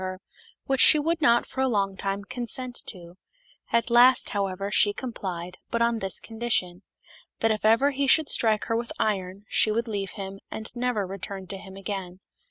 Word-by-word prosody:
45 185 - -2
her, 185 +1 -8 0.4
which 270 -1 +1
she - - +8
would 325 +3 0
not 240 -5 +4
for 265 - -5
a 265 - +3
long 200 -5 0
time 195 +1 -3
consent 250 +2 -4
to; 175 -2 -8 0.5
at 235 +1 +1
last, 245 +1 +6
however, 195 0 -2
she 205 0 +4
complied, 180 -8 -6
but 235 - -1
on 235 -1 +1
this 195 -2 -2
condition, 220 -6 -2 0.6
"That 225 - +3
if 215 - -2
ever 230 +6 +4
he 275 0 -1
should 310 +2 +4
strike 215 -2 +3
her 225 - -1
with 235 0 -3
iron, 195 -1 -2
she - - +3
would 230 +3 -1
leave 200 -3 -4
him, 195 0 -6
and 220 +2 -8
never 240 -4 -1
return 195 0 -6
to 195 - -5
him 190 -1 -11
again." 190 -2 -6
215 Hz, 190 wpm, -26 LUFS, 195-240 Hz, 0.6 s, she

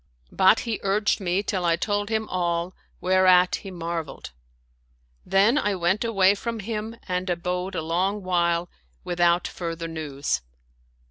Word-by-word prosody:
But 190 +3 +4
he 230 -3 -3
urged 200 +1 +1
me 190 +1 0
till 190 -3 -2
I 170 -1 +3
told 205 +3 -1
him 220 -1 -1
all, 175 0 -1 0.3
whereat 185 -1 +4
he 195 - -9
marveled. 170 -3 -5 1.0
Then 210 +9 +4
I 205 -5 0
went 180 +4 +1
away 200 -4 +4
from 230 +2 -4
him 220 +1 -4
and 180 0 -2
abode 180 +2 -2
a 165 - -2
long 190 +5 -1
while, 170 -1 +1 0.4
without 175 0 +2
further 165 -1 -5
news. 145 - -3
185 Hz, 140 wpm, -25 LUFS, 170-205 Hz, 1.0 s, But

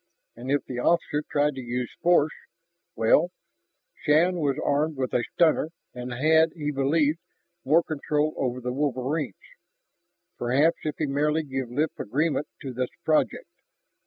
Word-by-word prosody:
And 120 +3 -8
if 145 +1 +1
the 125 -1 -5
officer 155 0 +1
tried 150 0 +2
to 135 - -6
use 125 0 -4
force, 170 -3 +4 0.6
well, 150 +10 +4 0.6
Shann 170 +5 +2
was 140 -4 0
armed 150 +1 +1
with 130 -1 -2
a 120 - +2
stunner, 160 -2 +3 0.2
and 125 0 -6
had, 160 +5 +3
he 150 -3 -3
believed, 145 +3 +1 0.4
more 160 +5 +4
control 150 0 -1
over 125 -1 -2
the 125 0 -3
wolverines. 140 - -1 1.0
Perhaps 140 +7 +3
if 150 - -2
he 155 - 0
merely 150 +3 +1
gave 135 -3 -4
lip 150 +6 0
agreement 150 +6 0 0.2
to 135 -2 -5
this 125 +1 -2 0.2
project.... 160 - +1
145 Hz, 145 wpm, -26 LUFS, 130-155 Hz, 1.0 s, force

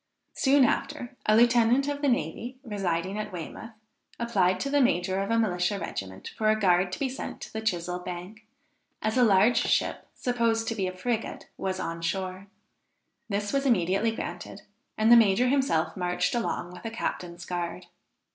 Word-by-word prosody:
Soon 275 -1 +4
after, 250 0 -2
a 215 - +5
lieutenant 240 +3 +4
of 285 0 -2
the 285 - +2
navy, 245 0 -2
residing 195 -3 -2
at 210 0 -4
Weymouth, 180 +5 -7 0.5
applied 190 -6 +2
to 275 - -1
the 290 0 +4
major 190 -5 +1
of 195 - -3
a 230 - +2
militia 190 -3 +1
regiment, 95 - -6
for 215 -1 +1
a 215 0 +3
guard 180 -2 +3
to - - -3
be 275 - 0
sent 260 +1 -6
to - - -9
the 220 - -3
Chisell 180 -4 -1
Bank, 180 +5 -7 0.6
as 215 0 0
a 250 - +5
large 215 +2 +5
ship, - - 0
supposed 230 -2 0
to - - -1
be 195 -3 -1
a 185 0 -6
frigate, 230 +3 -3
was 190 -1 -3
on 165 0 -4
shore. 185 +2 -3 0.8
This 205 +2 -2
was 275 0 +1
immediately 195 -1 +2
granted, 225 - -6 0.3
and 220 +2 +4
the - - +11
major 230 +2 +5
himself 265 - +1
marched 180 -1 0
along 225 -7 -2
with 180 0 -11
a 225 - -3
captain's 175 -6 -4
guard. 175 0 -4
210 Hz, 175 wpm, -27 LUFS, 180-235 Hz, 0.8 s, the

